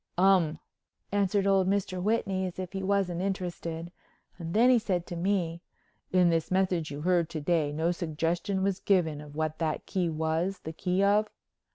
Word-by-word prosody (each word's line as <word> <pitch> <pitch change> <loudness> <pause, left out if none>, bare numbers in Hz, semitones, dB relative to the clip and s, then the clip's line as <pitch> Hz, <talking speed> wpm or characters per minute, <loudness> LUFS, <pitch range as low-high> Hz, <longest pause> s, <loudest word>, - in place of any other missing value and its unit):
"Um," 180 -4 +4 0.5
answered 200 0 +1
old 195 -1 +3
Mr. 190 -2 -1
Whitney 195 -2 0
as 180 - -8
if 185 0 -5
he 195 - -3
wasn't 190 -3 0
interested 175 -3 -4 0.5
and 165 +1 -5
then 240 +4 +6
he 245 - +5
said 185 -6 -1
to 175 - -6
me: 170 -2 -1 0.5
"In 180 -2 +4
this 165 -1 0
message 185 -4 +1
you 145 0 -6
heard 175 -1 +2
to 155 - -4
day 155 -1 +1
no 160 +3 0
suggestion 170 +3 -1
was 195 -1 0
given 160 -7 +1
of 145 -1 -12
what 155 0 -2
that 160 -2 -2
key 185 -3 -1
was 160 +4 -1
the 160 - -5
key 185 +3 0
of?" 205 +2 +3
180 Hz, 180 wpm, -29 LUFS, 165-195 Hz, 0.5 s, then